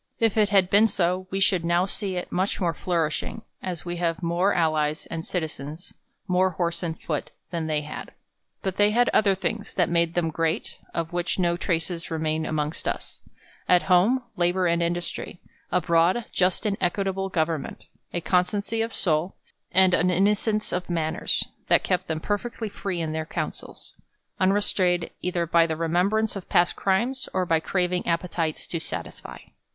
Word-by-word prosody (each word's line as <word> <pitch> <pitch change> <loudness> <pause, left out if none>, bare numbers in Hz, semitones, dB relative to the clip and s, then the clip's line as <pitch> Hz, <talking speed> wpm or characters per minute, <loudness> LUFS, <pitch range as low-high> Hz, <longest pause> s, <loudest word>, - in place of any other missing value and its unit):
If 225 -3 +2
it 210 -2 +4
had 195 -2 +4
been 210 +3 +6
so, 185 -2 0
we 195 - -2
should 190 -3 +3
now 170 +2 +2
see 195 -1 -3
it 180 - -4
much 190 +2 0
more 175 -4 +1
flourishing, 165 -4 -2 0.2
as 180 -3 -5
we 175 0 -3
have 170 +1 -1
more 175 +4 +2
al 165 -2 +3
lies 150 0 -1
and 165 -1 -3
citizens, 160 -1 -5 0.3
more 185 +1 +3
horse 170 -1 -2
and 165 -3 -3
foot, 150 -3 -3 0.2
than 165 -2 -2
they 155 -1 +1
had. 150 0 -7 0.5
But 190 -1 -2
they 205 0 +5
had 240 +3 +3
other 200 -2 +4
things, 205 +2 -3
that 180 -2 +2
made 170 -1 +2
them 165 -2 +1
great, 165 +4 -2
of 165 0 -3
which 175 0 -1
no 175 -2 +2
traces 170 -1 -2
remain 160 -1 -1
amongst 155 0 -2
us: - - -4 0.5
at 180 -1 +5
home, 195 +8 +4
labor 180 +1 +2
and 170 0 +2
industry; 175 +1 -3 0.3
abroad, 175 +5 +3
just 185 +3 +1
and 200 -2 0
equitable 195 +1 0
government; 160 -4 -2 0.3
a 175 - -2
constancy 200 +6 +1
of 225 +1 -1
soul, 160 +1 0 0.4
and 185 0 +5
an 180 +1 +3
innocence 210 +3 +1
of 180 0 -3
manners, 160 -2 0 0.2
that - - +4
kept 185 -1 0
them 160 -1 -2
perfectly 215 +4 -3
free 195 -3 -3
in 160 -1 -2
their 160 0 -3
councils; - - -5 0.5
unre 195 +2 +3
strained 175 -4 +1
either 175 -1 0
by 165 0 +4
tke 160 -1 -2
remembrance 185 +7 +1
of 195 - -7
past 175 0 +3
crimes, 235 +7 0
or 185 - +2
by 165 -2 +2
craving 180 +1 -1
appetites 165 -2 -1
to 170 - -3
satisfy. - - -6
175 Hz, 175 wpm, -25 LUFS, 165-195 Hz, 0.5 s, been